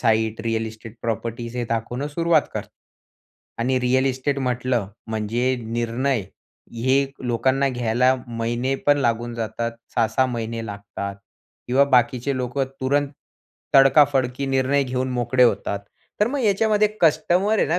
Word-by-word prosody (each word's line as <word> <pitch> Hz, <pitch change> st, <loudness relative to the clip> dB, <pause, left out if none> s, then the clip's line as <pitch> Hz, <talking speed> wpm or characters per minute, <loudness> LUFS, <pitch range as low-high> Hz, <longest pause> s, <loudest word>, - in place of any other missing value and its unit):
Site 110 Hz, -1 st, +1 dB
real 115 Hz, -1 st, 0 dB
estate 110 Hz, +1 st, -10 dB
properties 115 Hz, +1 st, -3 dB
हे 120 Hz, -, -1 dB
दाखवणं 120 Hz, +4 st, -2 dB
सुरुवात 165 Hz, 0 st, +2 dB
करतो. -, -, -5 dB, 0.9 s
आणि 130 Hz, +2 st, +1 dB
रिअल 130 Hz, +2 st, +2 dB
इस्टेट 135 Hz, +2 st, -1 dB
म्हटलं, 125 Hz, -4 st, -1 dB, 0.2 s
म्हणजे 115 Hz, +4 st, 0 dB
निर्णय, 120 Hz, +3 st, -1 dB, 0.6 s
हे 135 Hz, +1 st, +4 dB, 0.2 s
लोकांना 130 Hz, +3 st, +1 dB
घ्यायला 125 Hz, +1 st, +2 dB
महिने 120 Hz, +3 st, -1 dB
पण 145 Hz, 0 st, +5 dB
लागून 120 Hz, -2 st, 0 dB
जातात, 115 Hz, +1 st, -3 dB, 0.2 s
6-6 120 Hz, +3 st, +2 dB
महिने 115 Hz, -2 st, -4 dB
लागतात 100 Hz, -1 st, -6 dB, 0.5 s
किंवा 135 Hz, +3 st, +4 dB
बाकीचे 125 Hz, +2 st, +1 dB
लोकं 130 Hz, +2 st, -1 dB, 0.2 s
तुरंत 140 Hz, +2 st, +1 dB, 0.7 s
तडका-फडकी 135 Hz, -1 st, +4 dB
निर्णय 135 Hz, +1 st, +2 dB
घेऊन 130 Hz, 0 st, -2 dB
मोकळे 125 Hz, +1 st, +2 dB
होतात. 115 Hz, -4 st, +2 dB, 0.4 s
तर 210 Hz, -, +5 dB
मग 285 Hz, +3 st, -2 dB
याच्यामध्ये 215 Hz, 0 st, +3 dB
कस्टमर 175 Hz, +6 st, +3 dB
आहे -, -, +3 dB
ना 170 Hz, -, +2 dB
125 Hz, 130 wpm, -23 LUFS, 115-140 Hz, 0.9 s, पण